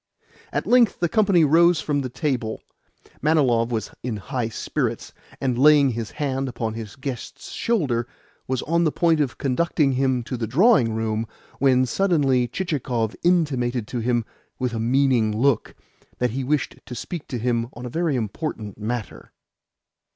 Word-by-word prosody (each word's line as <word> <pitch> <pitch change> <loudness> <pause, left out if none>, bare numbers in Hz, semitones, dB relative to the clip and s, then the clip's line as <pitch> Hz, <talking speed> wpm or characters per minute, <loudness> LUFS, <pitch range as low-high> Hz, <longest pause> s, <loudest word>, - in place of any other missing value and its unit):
At - - -2
length 240 -4 +4
the 175 - +2
company 190 -3 +4
rose 170 +3 +5
from 145 -2 -1
table. 130 -3 -3 0.6
Manilov 130 -7 +3
was 115 -2 -3
in 120 -3 -3
high 120 +2 -3
spirits, - - -3 0.3
and, 125 -2 -1
laying 145 -1 +6
his 115 -2 -4
hand 135 -2 -1
upon 115 -2 -3
his 110 -2 -7
guest's 130 -3 -7
shoulder, 135 - 0 0.4
was 130 -1 -1
on 170 +2 +1
the 155 - +2
point 165 -1 +2
of 140 -5 -1
conducting 145 +1 +1
him 130 -1 +1
to 125 +2 -4
the 115 -1 -3
drawing 135 - +4
room, 110 0 -1 0.3
when 130 -1 +4
suddenly 135 -5 +2
Chichikov 125 - -2
intimated 130 -10 +1
to 125 - -3
him, 120 0 0 0.3
with 125 -2 -2
a 115 - -2
meaning 120 -3 +2
look, 135 +1 +1 0.4
that 125 -2 0
he 130 +3 -3
wished 140 +1 -1
to 125 - -6
speak 170 +4 -6
to 125 - -4
him 115 0 0
on 120 +2 -8
a - - -4
very 165 +1 0
important 110 - -4
matter. 110 +1 -5
130 Hz, 160 wpm, -23 LUFS, 115-150 Hz, 0.6 s, laying